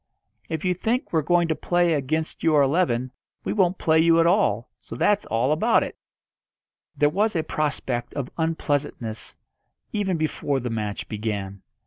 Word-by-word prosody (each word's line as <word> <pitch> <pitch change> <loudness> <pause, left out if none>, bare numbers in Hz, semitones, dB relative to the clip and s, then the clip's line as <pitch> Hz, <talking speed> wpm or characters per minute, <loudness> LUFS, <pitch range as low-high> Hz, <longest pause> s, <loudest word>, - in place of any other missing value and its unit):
If 160 +2 -3
you 180 - +3
think 225 +7 -2
we're 160 - +3
going 170 +3 +2
to - - +3
play 175 0 +1
against 155 +2 -2
your 155 -3 +4
eleven 135 -5 +1 0.3
we - - -2
won't 190 -3 +2
play 160 0 +3
you 165 0 +5
at 165 - +4
all, 170 - +2
so - - -9
that's 205 - +2
all 115 +5 +1
about 220 +10 +3
it." - - -6 1.0
There 145 - +4
was 205 +7 +1
a 160 - +1
prospect 140 -6 -2
of 135 -3 -4
unpleasantness 145 -8 -2 0.6
even 195 -4 0
before 150 -3 -1
the 120 -1 -4
match 105 -2 -3
began. 100 -3 -4
155 Hz, 160 wpm, -24 LUFS, 125-175 Hz, 1.0 s, you